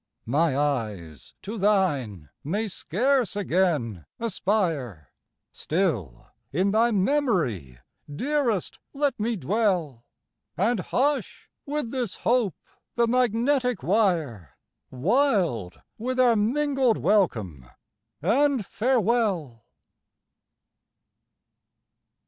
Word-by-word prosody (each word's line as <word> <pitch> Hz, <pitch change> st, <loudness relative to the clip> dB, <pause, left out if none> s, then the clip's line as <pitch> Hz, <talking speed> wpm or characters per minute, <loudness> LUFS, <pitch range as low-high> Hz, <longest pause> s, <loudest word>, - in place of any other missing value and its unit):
My 140 Hz, +3 st, +1 dB
eyes 105 Hz, -, -3 dB
to 215 Hz, +2 st, -5 dB
thine 145 Hz, -, 0 dB
may 205 Hz, +9 st, -2 dB
scarce 240 Hz, -, 0 dB
again 155 Hz, -, 0 dB
aspire 170 Hz, -, -2 dB, 0.4 s
Still 135 Hz, -, -2 dB, 0.3 s
in 185 Hz, +8 st, +1 dB
thy 225 Hz, +3 st, +3 dB
memory, 185 Hz, -, 0 dB, 0.3 s
dearest 250 Hz, -, -1 dB
let 285 Hz, -3 st, 0 dB
me 225 Hz, +2 st, 0 dB
dwell, 180 Hz, -, -1 dB, 0.5 s
And 220 Hz, +4 st, +1 dB
hush, 275 Hz, -, -1 dB, 0.2 s
with 290 Hz, -5 st, -3 dB
this 250 Hz, -6 st, -3 dB
hope, 235 Hz, -6 st, +2 dB, 0.4 s
the 235 Hz, -, +3 dB
magnetic 250 Hz, -, +1 dB
wire, 160 Hz, -, 0 dB, 0.3 s
Wild 170 Hz, -, 0 dB, 0.2 s
with 255 Hz, +3 st, -2 dB
our 245 Hz, -2 st, +5 dB
mingled 260 Hz, +2 st, +1 dB
welcome 110 Hz, -, 0 dB, 0.5 s
and 260 Hz, -, +2 dB
farewell! 215 Hz, -, 0 dB
195 Hz, 85 wpm, -25 LUFS, -, 0.5 s, our